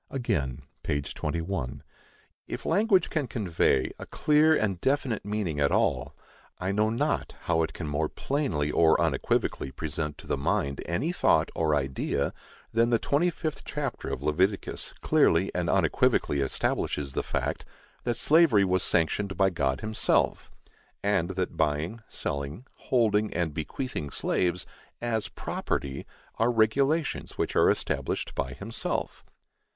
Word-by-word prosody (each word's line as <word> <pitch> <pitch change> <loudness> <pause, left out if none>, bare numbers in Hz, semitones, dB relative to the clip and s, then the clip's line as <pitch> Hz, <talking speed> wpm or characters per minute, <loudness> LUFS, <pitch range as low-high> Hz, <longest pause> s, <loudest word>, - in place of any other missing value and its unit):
Again 70 - -2 0.2
(p. 70 - 0
21): 75 0 -3 0.6
If - - -6
language 200 -2 +3
can 150 -5 0
convey 90 - +1
a - - -8
clear 155 +1 +4
and 100 - 0
definite 135 -5 0
meaning 105 -7 -2
at 70 -1 +3
all, - - +1 0.4
I 95 +1 -2
know 105 +2 +2
not 115 - -1
how 80 -1 +1
it 80 - -1
can 85 - -6
more 75 +1 -1
plainly 110 - -1
or 80 0 +4
unequivocally - - 0
present 75 +2 -4
to - - -12
the - - -1
mind 70 0 0
any 85 - 0
thought 180 - +3
or 80 -2 +1
idea, 70 0 -1 0.4
than 115 +1 +3
the 120 - +4
twenty 145 +9 +2
fifth 155 -2 -4
chapter - - -4
of 65 - -4
Leviticus 95 +7 0
clearly - - +3
and - - -1
unequivocally 70 - +2
establishes 70 0 -1
the - - 0
fact - - -2 0.4
that 120 -1 -1
slavery 145 -10 +5
was 95 -1 +2
sanctioned 95 +4 +1
by 95 0 +4
God 70 -6 0
himself, 110 0 +1 0.5
and 100 -4 +1
that 90 -1 -2
buying, 80 +10 0
selling, 70 - -4 0.2
holding 110 -4 +3
and 85 -3 0
bequeathing 80 - -4
slaves, 90 +5 0 0.3
as 115 -3 -1
property, 70 -1 -3 0.3
are 115 +2 +3
regulations 135 +8 +1
which - - -1
are - - +5
established - - -1
by 65 - -3
himself. 110 - -3
95 Hz, 140 wpm, -28 LUFS, 75-115 Hz, 0.6 s, slavery